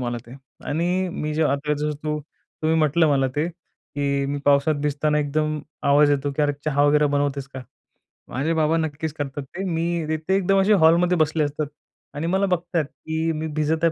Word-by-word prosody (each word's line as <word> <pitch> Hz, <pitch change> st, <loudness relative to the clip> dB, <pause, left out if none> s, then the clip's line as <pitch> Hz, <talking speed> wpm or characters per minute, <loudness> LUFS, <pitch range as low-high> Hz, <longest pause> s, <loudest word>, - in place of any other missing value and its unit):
मला 120 Hz, -1 st, -2 dB
ते. 120 Hz, -, -11 dB, 0.3 s
आणि 175 Hz, +5 st, 0 dB
मी 150 Hz, 0 st, -3 dB
जे 160 Hz, -, +1 dB
आता 150 Hz, 0 st, 0 dB
जसं 150 Hz, +1 st, -2 dB
तू 150 Hz, 0 st, -1 dB, 0.4 s
तुम्ही 160 Hz, +1 st, +2 dB
म्हटलं 155 Hz, +1 st, +3 dB
मला 135 Hz, -2 st, +2 dB
ते, 155 Hz, +3 st, +1 dB
की 140 Hz, -5 st, -4 dB
मी 145 Hz, +1 st, -2 dB
पावसात 145 Hz, +2 st, +4 dB
भिजताना 150 Hz, +1 st, +1 dB
एकदम 155 Hz, +1 st, 0 dB, 0.3 s
आवाज 145 Hz, +1 st, +5 dB
येतो 145 Hz, 0 st, 0 dB
की 150 Hz, -, +2 dB
"अरे 145 Hz, 0 st, +2 dB
चहा 145 Hz, -2 st, +2 dB
वगैरे 150 Hz, 0 st, +4 dB
बनवतेस 140 Hz, -1 st, -1 dB
का?" 130 Hz, -1 st, -8 dB, 0.7 s
माझे 145 Hz, +6 st, -1 dB
बाबा 160 Hz, 0 st, +2 dB
नक्कीच 160 Hz, -1 st, -3 dB
करतात 145 Hz, -1 st, -5 dB
ते. 185 Hz, +8 st, -7 dB
मी 170 Hz, -2 st, -1 dB
ते 155 Hz, 0 st, 0 dB
ते 185 Hz, +5 st, -1 dB
एकदम 195 Hz, 0 st, +2 dB
असे 210 Hz, +2 st, +4 dB
हॉलमध्ये 175 Hz, +2 st, +4 dB
बसले 155 Hz, 0 st, +2 dB
असतात. 145 Hz, 0 st, -2 dB, 0.5 s
आणि 155 Hz, +3 st, -3 dB
मला 195 Hz, +1 st, +3 dB
बघतायत, 175 Hz, -4 st, 0 dB
की 160 Hz, +2 st, -3 dB
मी 160 Hz, 0 st, -3 dB
भिजत 160 Hz, +2 st, 0 dB
आहे 165 Hz, -, +4 dB
155 Hz, 195 wpm, -23 LUFS, 145-165 Hz, 0.7 s, आवाज